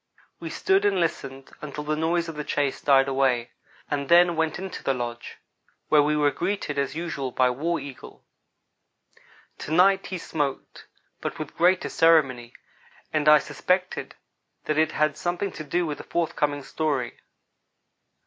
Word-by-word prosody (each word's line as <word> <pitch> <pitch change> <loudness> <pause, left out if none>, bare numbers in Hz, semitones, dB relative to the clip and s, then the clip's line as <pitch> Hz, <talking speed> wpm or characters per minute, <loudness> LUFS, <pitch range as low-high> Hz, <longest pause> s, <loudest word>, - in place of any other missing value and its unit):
We - - -6
stood 385 -1 +1
and 200 -2 +2
listened 135 -5 -3
until 150 0 -6
the 155 +1 -1
noise 165 +2 0
of 165 - -5
the 150 0 -5
chase 145 -2 -1
died 135 -1 +4
away, 130 -3 +1 0.4
and 140 -1 -3
then 175 0 +6
went 160 -1 0
into 190 0 -6
the 135 - +1
lodge, 120 -1 -6 0.5
where 150 -1 +6
we 150 +1 +1
were 145 -1 +3
greeted, 175 -5 -2
as 140 +1 -2
usual, 160 -5 -3
by 125 0 +2
War 165 +7 -1
Eagle. 140 -3 -11 1.3
To - - -7
night 190 +4 +4
he 185 - -4
smoked; 145 -5 -4 0.3
but - - -4
with 155 -2 -7
greater 180 +2 +3
ceremony, 135 -8 +3 0.6
and 155 -1 +3
I 150 - +9
suspected 180 +6 -2 0.5
that 155 0 0
it 160 0 +2
had 155 -1 +1
something 175 +3 -2
to 155 - -7
do 175 +4 -1
with 150 -2 -4
the - - -7
forthcoming 150 -4 -1
story. 140 -7 -2
150 Hz, 160 wpm, -25 LUFS, 140-170 Hz, 1.3 s, I